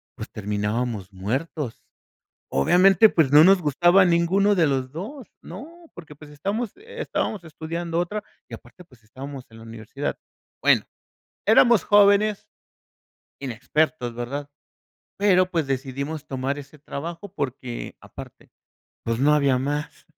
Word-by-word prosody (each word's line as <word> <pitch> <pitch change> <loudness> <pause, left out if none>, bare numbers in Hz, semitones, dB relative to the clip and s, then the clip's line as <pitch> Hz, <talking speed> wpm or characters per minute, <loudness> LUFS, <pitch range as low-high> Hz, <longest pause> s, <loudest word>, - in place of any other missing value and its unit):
pues - - -8
terminábamos 105 0 -3
muertos, 125 - -4 0.7
obviamente, 185 - +5
pues, 160 -9 +2
no 150 +2 +8
nos 190 0 +5
gustaba 175 +5 +4
ninguno 180 +4 +3
de 170 -4 +3
los 130 -2 -1
2 220 - -8
no, 335 +4 -11
porque, 160 -4 -11
pues, 150 +1 -14
estamos 200 +10 -3
estábamos 440 - -4
estudiando 165 +2 -4
otra 205 +5 -2 0.3
y - - -12
aparte, 120 +8 -12
pues, 125 -8 -23
estábamos 135 +4 -9
en 115 - -15
la 115 - -12
universidad, 115 +5 -5 0.4
bueno, - - +4 0.6
éramos 235 -4 +5
jóvenes, 205 0 +4 0.9
inexpertos, 130 0 -1
¿verdad?, 140 +4 -5 0.7
pero, 185 -2 +3
pues, 165 -5 -1
decidimos 140 +3 -4
tomar 135 +1 -3
ese 145 +1 -11
trabajo 170 +7 -7
porque 130 -6 -5
aparte, - - -12 0.6
pues, 115 0 -1
no 150 +2 +4
había 140 -3 +3
más, 145 +3 -4
150 Hz, 130 wpm, -24 LUFS, 130-185 Hz, 0.9 s, no